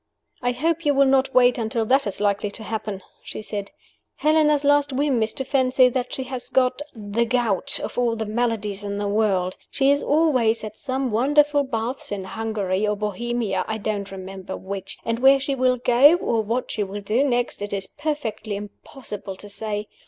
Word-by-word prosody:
"I 245 0 +1
hope 325 +6 0
you 290 -2 +2
will 275 0 +5
not 265 0 +2
wait 250 -1 +5
until 225 0 -1
that 265 +2 +3
is 200 - -4
likely 205 0 0
to 220 +2 -7
happen," 210 -3 -4 0.2
she - - -7
said. 205 -2 -5 0.5
"Helena's 300 -1 +3
last 285 0 +3
whim 270 -2 +1
is 220 0 +1
to 265 - -3
fancy 255 -1 +4
that 250 0 -3
she 265 - -3
has 255 -1 -6
got 255 +1 +2
the 215 +1 -1
gout, 235 -5 +1
of - - -4
all 235 -2 +1
the 220 -1 -3
maladies 210 -3 -1
in 200 0 -3
the 205 0 -2
world! 200 -3 +1
She 275 0 +3
is 285 0 +2
away 285 -8 +3
at 215 -1 -6
some 260 0 -2
wonderful 290 +5 +3
baths 250 -2 -3
in 200 -2 -3
Hungary 210 -1 -2
or 210 - +1
Bohemia 210 0 -2
(I 220 - -2
don't 205 -2 -3
remember 190 0 -7
which) 195 0 -6
and 230 0 -1
where 270 +2 +6
she 275 +1 -2
will 255 -1 +2
go, 250 +6 +6
or 235 -10 0
what 230 +4 -2
she 215 - -2
will 205 +1 -4
do 215 +7 +1
next, 245 -5 0
it 205 - -4
is 195 -1 -2
perfectly 225 -7 -4
impossible 205 0 -8
to 205 - -8
say. 210 0 -4
230 Hz, 195 wpm, -23 LUFS, 205-265 Hz, 0.5 s, where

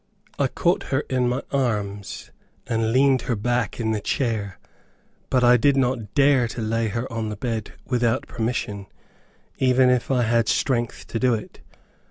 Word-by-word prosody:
I - - +3
caught - - 0
her - - +1
in 125 -1 +2
my 125 +3 -2
arms, 105 -7 -2 0.3
and 115 -2 0
leaned 130 +1 +4
her 120 - +2
back 120 +1 -1
in 110 -1 0
the 110 -1 -1
chair, 110 -7 -2 0.7
but 125 -1 +2
I 125 0 +6
did 140 +4 +3
not 125 -6 -1
dare 135 -3 +4
to 115 - -6
lay 115 +1 0
her 115 +3 -3
on 110 -1 -2
the 105 - -4
bed, 110 -1 -4
without 120 0 0
permission, 110 -4 -3 0.7
even 130 0 +4
if 125 -2 0
I 125 -2 +2
had 115 -1 +2
strength 120 -3 0
to 115 - -4
do 125 -1 +3
it. 110 - -8
120 Hz, 170 wpm, -23 LUFS, 110-125 Hz, 0.7 s, I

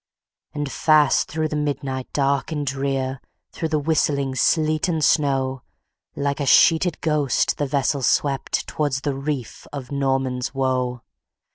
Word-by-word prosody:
And 145 -2 -3
fast 150 -3 +3
through 155 0 -1
the 150 - -3
midnight 140 -3 -3
dark 140 +1 0
and 150 -2 -2
drear 135 -1 -2 0.3
Through 160 - -3
the 155 - +1
whistling 140 -3 0
sleet 155 +4 +2
and 160 -3 -1
snow, 135 -3 +1 0.5
Like 140 0 -1
a 140 - -2
sheeted 165 +4 +4
ghost, 150 -6 +1
the 145 - 0
vessel 140 +1 0
swept 135 +1 0
Towards 145 -3 -2
the 145 -1 -1
reef 135 -3 -5
of 140 -3 -7
Norman's 135 -2 -1
Woe. 130 -2 -1
140 Hz, 140 wpm, -22 LUFS, 135-150 Hz, 0.5 s, sheeted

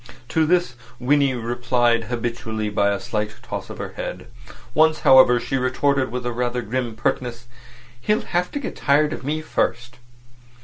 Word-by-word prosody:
To 160 -1 +2
this 175 -5 +2 0.3
Winnie 135 +1 +2
replied 120 0 +1
habitually 115 -2 -3
by 100 -1 +2
a 100 - -1
slight 105 -2 -3
toss - - -6
of - - -8
her - - -5
head. 90 +3 -6 0.5
Once, 155 +2 +3
however, 130 -2 +7
she 135 - -2
retorted, 130 +1 +1
with 125 0 -4
a 120 - -1
rather 120 0 -2
grim 120 0 -3
pertness: 120 +1 -2 0.6
"He'll 210 - +1
have 180 0 -1
to 285 - -2
get 275 - -5
tired 150 +2 +2
of - - -7
me 155 +3 -2
first." 120 -4 -2
125 Hz, 165 wpm, -22 LUFS, 120-140 Hz, 0.6 s, however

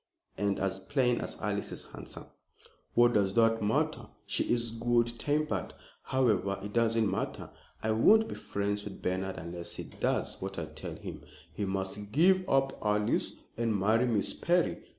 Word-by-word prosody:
"And 100 0 0
as 95 0 -1
plain 125 +5 +1
as - - -4
Alice 105 -1 -2
is - - -4
handsome." - - -9 0.7
"What 120 0 +6
does 100 -3 +2
that 115 -1 +4
matter? 105 +1 0 0.2
She - - 0
is 120 -1 +2
good 120 +1 +2
tempered. 145 - -1 0.3
However, 105 -7 +1
it 105 0 -6
doesn't 115 -1 +3
matter. - - -3 0.3
I 110 - +1
won't 220 - +5
be - - -5
friends 100 0 -2
with 105 -2 -9
Bernard 95 +1 -1
unless 85 +1 -6
he - - -5
does - - -2
what 95 0 -5
I 85 - -2
tell 75 0 -8
him. - - -8 0.3
He 105 - -2
must 95 +1 -3
give 185 - +4
up 135 0 +2
Alice 105 0 +1 0.2
and 115 -2 +1
marry 110 +5 +3
Miss 110 -4 +1
Perry. 175 0 +1
105 Hz, 165 wpm, -31 LUFS, 95-120 Hz, 0.7 s, What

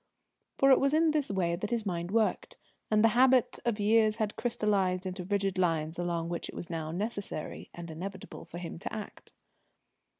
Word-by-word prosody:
For 275 0 +5
it 265 - +7
was 275 +2 +2
in 320 0 +4
this 300 -3 0
way 180 -4 0
that 205 +4 -4
his 235 -2 -1
mind 175 -2 -2
worked, 220 +2 0 0.3
and 215 0 +3
the 225 - +7
habits 255 +1 +4
of 230 -3 0
years 215 +1 +4
had 215 -2 -2
crystallised 200 -6 0
into 185 0 -4
rigid 195 0 -1
lines 165 -2 0
along 170 -1 -1
which 170 0 -4
it - - -9
was 175 - -6
now 160 -2 -3
necessary 200 -2 -4
and 170 -1 -8
inevitable 190 +4 -7
for 170 - -9
him 170 -1 -6
to - - -5
act. 215 - -8
195 Hz, 190 wpm, -30 LUFS, 175-225 Hz, 0.3 s, it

